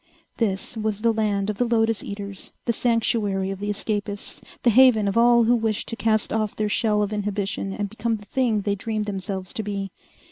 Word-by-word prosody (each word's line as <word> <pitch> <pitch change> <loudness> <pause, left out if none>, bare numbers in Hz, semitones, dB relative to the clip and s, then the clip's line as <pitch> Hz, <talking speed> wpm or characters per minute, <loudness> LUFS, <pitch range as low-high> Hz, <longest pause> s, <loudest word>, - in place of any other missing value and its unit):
This 200 0 -1
was 215 -1 -2
the 230 0 +3
land 205 -3 0
of 205 - -10
the - - +4
lotus 225 -2 +1
eaters, 200 -1 -7
the 235 - +1
sanctuary 215 -5 +1
of 195 - -6
the 205 +1 -3
escapists, 205 0 -3 0.2
the 240 - +5
haven 235 -3 +6
of 195 - -1
all 235 0 +6
who 235 +2 +4
wished 220 -2 -1
to 230 - -3
cast 220 -2 +1
off 215 -2 -1
their 215 -1 -1
shell 210 0 +2
of 205 +1 -3
inhibition 205 -1 -2
and 205 +1 -2
become 225 +2 -2
the 210 -1 -10
thing 230 -1 +1
they 200 0 0
dreamed 215 +1 -2
themselves 190 -2 -4
to - - -2
be. 200 -2 -4
210 Hz, 205 wpm, -24 LUFS, 200-225 Hz, 0.2 s, haven